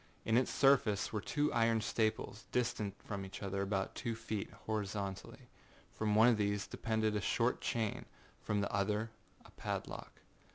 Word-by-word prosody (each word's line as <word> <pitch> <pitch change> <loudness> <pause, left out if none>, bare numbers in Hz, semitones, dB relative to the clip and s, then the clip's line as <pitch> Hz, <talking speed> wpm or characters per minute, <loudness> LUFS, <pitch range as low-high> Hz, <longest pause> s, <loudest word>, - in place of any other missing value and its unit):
In 110 - +2
its 125 +2 +4
surface 125 -8 +3
were 105 - -1
two 145 +7 0
iron 115 -1 +3
staples, 110 0 -1
distant 110 -5 0
from 100 -2 -4
each 95 +2 -7
other 100 0 -1
about 100 -1 -1
two 115 -1 -3
feet, 110 -2 -3 0.2
horizontally. 100 -2 -3 0.4
From 105 -1 0
one 110 +2 +7
of 120 -3 +5
these 105 -1 0
depended 110 -1 0
a 105 - 0
short 120 +4 +1
chain, 110 -3 -1 0.4
from 105 -1 0
the 100 - -2
other 105 +3 0 0.3
a - - -15
padlock. - - -5
110 Hz, 160 wpm, -35 LUFS, 100-115 Hz, 0.4 s, one